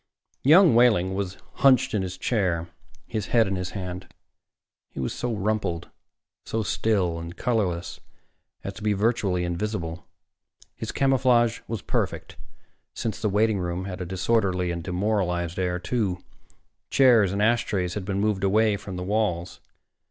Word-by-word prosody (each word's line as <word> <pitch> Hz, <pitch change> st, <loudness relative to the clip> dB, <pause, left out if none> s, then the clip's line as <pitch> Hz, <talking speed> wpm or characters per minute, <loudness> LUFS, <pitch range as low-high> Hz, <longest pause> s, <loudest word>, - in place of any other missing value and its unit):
Young 160 Hz, +2 st, +7 dB
Wehling 110 Hz, -6 st, +4 dB
was 95 Hz, -1 st, -3 dB, 0.2 s
hunched 135 Hz, -3 st, +4 dB
in 105 Hz, -, +1 dB
his 90 Hz, -1 st, -5 dB
chair, 90 Hz, -7 st, 0 dB, 0.4 s
his 110 Hz, -3 st, -4 dB
head 115 Hz, -2 st, +4 dB
in 95 Hz, -1 st, -2 dB
his 90 Hz, -1 st, -3 dB
hand. 90 Hz, -1 st, -6 dB, 0.8 s
He -, -, -9 dB
was 65 Hz, -, -2 dB
so 125 Hz, -, -3 dB
rumpled, 100 Hz, -5 st, -2 dB, 0.5 s
so 110 Hz, 0 st, -2 dB
still 95 Hz, -6 st, 0 dB
and 85 Hz, +1 st, -8 dB
colorless 95 Hz, -8 st, -1 dB, 0.6 s
as -, -, -5 dB
to -, -, -12 dB
be 105 Hz, 0 st, +1 dB
virtually 100 Hz, -4 st, +1 dB
invisible. 85 Hz, -2 st, -3 dB, 0.7 s
His -, -, -5 dB
camouflage 125 Hz, -4 st, +3 dB
was 110 Hz, -4 st, -4 dB
perfect, -, -, -2 dB, 0.6 s
since 110 Hz, -1 st, -3 dB
the 110 Hz, -, +1 dB
waiting 105 Hz, 0 st, +2 dB
room 90 Hz, +1 st, -3 dB
had 95 Hz, -1 st, -6 dB
a -, -, -3 dB
disorderly 95 Hz, -1 st, 0 dB
and 85 Hz, -1 st, -4 dB
demoralized 90 Hz, -2 st, -1 dB
air, 90 Hz, -1 st, 0 dB
too. 95 Hz, 0 st, -1 dB, 0.7 s
Chairs 120 Hz, -8 st, +5 dB
and 100 Hz, -, -2 dB
ashtrays 105 Hz, -5 st, +1 dB
had 105 Hz, -, -4 dB
been 100 Hz, 0 st, -2 dB
moved 105 Hz, -2 st, 0 dB
away 105 Hz, +1 st, +3 dB
from 95 Hz, -1 st, -8 dB
the 90 Hz, -, -4 dB
walls. 95 Hz, -3 st, -1 dB
100 Hz, 150 wpm, -25 LUFS, 90-110 Hz, 0.8 s, Young